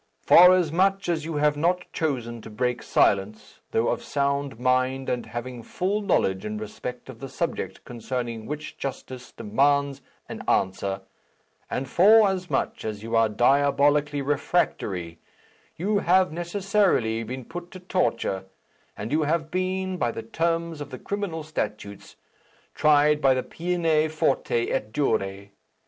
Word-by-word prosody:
Forasmuch 185 +2 +5
as 160 -3 -1
you 165 -1 -4
have 150 0 +2
not 175 +4 +1
chosen 120 -8 -2
to 110 - -10
break 125 +3 -1
silence, 105 +2 0
though 115 - +1
of - - -1
sound 140 -3 -1
mind 130 +1 +1
and 120 -2 -2
having 120 +2 -6
full 190 - -2
knowledge 95 - +1
in 105 0 -4
respect 115 +4 -7
of 130 -4 -10
the 135 - -7
subject 165 +6 -4
concerning 120 -2 -5
which 150 +1 -6
justice 130 -1 -6
demands 140 +5 +1 0.3
an - - -7
answer, 95 +1 0 0.7
and 135 - -3
forasmuch 190 - +3
as 105 -1 -5
you 115 +1 -3
are 115 -1 +4
diabolically 140 +5 +2
refractory, 100 - -1 0.6
you 205 +4 0
have 185 -1 +3
necessarily 175 - +1
been 125 +2 -6
put 175 +1 -8
to 185 - -10
torture, 115 - -1 0.5
and 110 +4 -5
you 155 +2 +2
have 155 +1 -1
been, 185 0 -1
by 120 -8 0
the 115 -1 -5
terms 165 +5 -2
of 145 - -6
the 130 - -7
criminal 200 -4 -4
statutes, 105 -9 -5 0.6
tried 150 0 +4
by 135 -2 +4
the 130 - -1
'Peine 165 -3 0
forte 135 -6 0
et 105 0 -2
dure.' 100 -7 -1
140 Hz, 140 wpm, -25 LUFS, 115-170 Hz, 0.7 s, Forasmuch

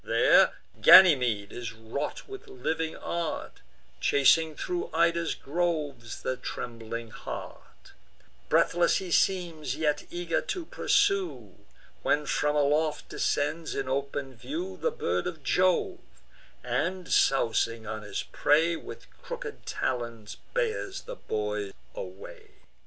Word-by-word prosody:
There - - +5 0.3
Ganymede 125 - +7
is 115 -2 -6
wrought 115 +6 -5
with 400 +3 -10
living 160 - -3
art, 170 -2 -4 0.4
Chasing 155 +3 +4
thro' 355 -1 -3
Ida's 170 0 +2
groves 150 -7 -3
the 130 - -1
trembling 115 -2 -6
hart: - - -9 0.6
Breathless 175 0 +3
he 185 -2 -3
seems, 165 -7 +1
yet 150 -1 0
eager 175 -1 -1
to 365 -5 -4
pursue; 395 +2 +1 0.5
When 150 0 +1
from 150 +1 +1
aloft 150 +1 +1
descends, 155 +3 -1
in 135 -1 -2
open 140 0 -3
view, 340 - -5
The 480 - 0
bird 470 0 -2
of - - -6
Jove, 185 -1 +2 0.6
and, 165 +9 -1
sousing 115 -4 +2
on 110 0 -5
his 105 -1 -4
prey, 160 +3 +2
With - - -9 0.2
crooked - - -7
talons 115 -4 -3 0.2
bears 440 -5 -1
the - - -8
boy 105 - -3 0.2
away. 95 +1 -10
150 Hz, 115 wpm, -28 LUFS, 120-180 Hz, 0.6 s, Ganymede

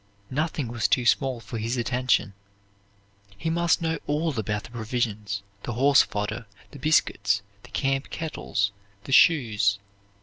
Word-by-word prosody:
Nothing 150 -1 -1
was 115 -1 0
too 125 - +2
small 130 0 +2
for 115 +1 -6
his 115 +4 -2
attention. 125 -3 +1 1.0
He 160 +10 -2
must 170 0 +2
know 165 -1 0
all 150 +1 0
about 105 0 -2
the - - -12
provisions, 110 -4 -2 0.2
the 120 - -4
horse 135 +4 +5
fodder, 105 +2 -3 0.2
the 145 - -11
biscuits, 100 -9 +2 0.2
the - - -15
camp 135 0 -1
kettles, 125 -10 -2 0.3
the 135 - -8
shoes. 110 -10 +4
120 Hz, 140 wpm, -26 LUFS, 105-145 Hz, 1.0 s, horse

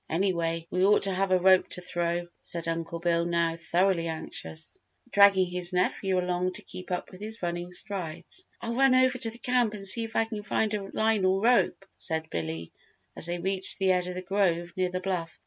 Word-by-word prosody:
Anyway 165 -2 0
we 185 - +1
ought 205 +2 +5
to 195 -1 +1
have 195 +1 0
a 185 - +5
rope 185 0 +5
to - - -4
throw," 175 -1 -2
said 170 -1 -5
Uncle 165 0 -3
Bill 170 0 +1
now 170 -1 +1
thoroughly 170 +1 +1
anxious, 160 - -5 0.3
dragging 200 -2 +6
his 180 0 -2
nephew 185 +1 +1
along 180 0 0
to - - -7
keep 185 - -10
up 180 -1 -3
with 185 +1 -12
his 220 -1 -6
running 175 +1 -3
strides. 185 - -4
"I'll 230 - -3
run 265 +1 +4
over 255 0 +3
to 230 -2 +2
the 225 - -9
camp 245 -3 +1
and 195 -1 -6
see 215 +4 +3
if 225 0 -7
I 225 - +3
can 220 -2 -5
find 215 +1 0
a 200 -2 -3
line 220 -2 +2
or 185 +1 +3
rope," 235 -4 +3
said 160 0 -2
Billy, 80 0 -4 0.4
as - - 0
they 175 0 -2
reached 190 +2 -2
the 190 -1 +3
edge 180 -1 +1
of 180 - -5
the 185 - -5
grove 175 -3 0
near 185 -1 0
the 185 0 -3
bluff. 180 -4 -3
185 Hz, 215 wpm, -28 LUFS, 170-200 Hz, 0.4 s, dragging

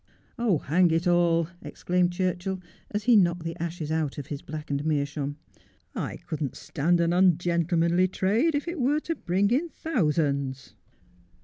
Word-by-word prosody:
' - - -36
Oh, 225 -8 +2
hang 170 +5 +2
it 165 +2 +1
all,' 170 -2 +3
exclaimed 180 0 0
Churchill, 185 +1 -2 0.3
as 210 0 -3
he 240 0 +5
knocked 175 -4 +3
the 165 0 -4
ashes 165 -2 -4
out 160 -3 -1
of 145 - -5
his 140 +1 -6
blackened 150 -2 -4
meerschaum, 145 -1 -1 0.3
' - - -34 0.2
I - - -3
couldn't 155 -6 -3
stand 170 +5 0
an 170 0 +2
un 180 -2 +5
gentlemanly 170 +1 +2
trade 215 - +1
if 290 +3 -2
it 340 -1 -4
were 285 +5 +2
to 330 - -2
bring 195 - 0
in 305 +8 +1
thousands.' 150 - -1
175 Hz, 170 wpm, -26 LUFS, 155-190 Hz, 0.3 s, he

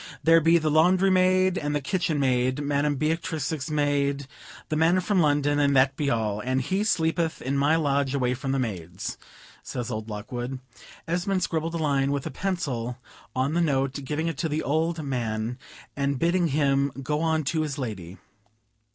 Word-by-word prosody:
"There 165 0 +6
be 165 +2 +5
the 155 -2 0
laundry 180 +5 +4
maid, 185 0 +3
and 145 0 -2
the - - +2
kitchen 155 +1 -1
maid, 130 0 +1
Madam 145 0 +1
Beatrix's 155 -1 -2
maid, 140 -2 0 0.4
the 155 - -1
man 165 +4 +3
from 190 +1 +1
London, 145 -2 +2
and 140 -1 +3
that 135 +1 +4
be 145 -1 -1
all; 110 -4 0
and 130 +3 0
he 190 +10 -1
sleepeth 165 -4 0
in 135 +2 -2
my 145 +3 +3
lodge 140 -3 +1
away 125 -2 +1
from 135 +1 -3
the 135 - +1
maids," 95 -7 -4 0.4
says 120 -2 -5
old 110 +1 -4
Lockwood. 120 +5 -5 0.5
Esmond 180 +3 0
scribbled 165 +1 -2
a - - 0
line 140 -3 +1
with 140 -1 -2
a - - -4
pencil 130 -9 -3 0.4
on 130 +3 0
the 175 - +2
note, 135 -4 +1
giving 150 +4 -2
it 165 -5 -3
to 160 - -1
the 155 +1 -1
old 160 +3 0
man, 120 -3 -2 0.4
and 140 -1 0
bidding 170 +4 +2
him 140 -1 +1
go 150 +2 -1
on 160 -1 +1
to 155 +3 0
his 150 -2 -3
lady. 100 -9 -5
145 Hz, 180 wpm, -26 LUFS, 130-165 Hz, 0.5 s, There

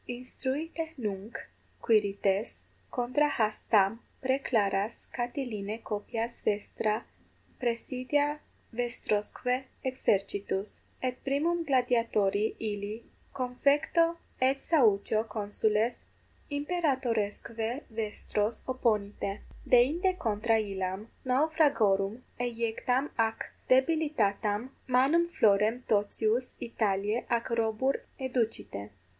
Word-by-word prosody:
Instruite 280 +6 -4
nunc, 210 -1 -4 0.4
Quirites, 205 -2 +1 0.3
contra 255 +5 +1
has 215 -6 0
tam 210 +1 +4 0.2
praeclaras 225 -6 0
Catilinae 235 -4 -3
copias 225 +2 -4
vestra 215 +1 0 0.5
praesidia 260 +5 0 0.3
vestrosque 240 +1 -1 0.2
exercitus: 200 -5 0 0.2
et 255 -1 -2
primum 325 +5 +1
gladiatori 230 -6 +2
illi 210 +1 -4 0.3
confecto 285 +6 +2 0.2
et 265 +1 +3
saucio 220 -6 +3
consules 215 +2 0 0.5
imperatoresque 260 - -1
vestros 215 0 -2
opponite; 210 -5 0 0.3
deinde 325 +10 +4
contra 225 - +1
illam 195 0 -3
naufragorum 255 -7 +2 0.2
eiectam 245 +3 0
ac 225 0 0 0.2
debilitatam 255 -6 +2 0.2
manum 275 +7 +4
florem 220 -2 +3
totius 220 +3 +1
Italiae 210 -1 0
ac 235 +1 0
robur 230 +3 +1 0.2
educite. 230 - -2
230 Hz, 80 wpm, -30 LUFS, 210-260 Hz, 0.5 s, tam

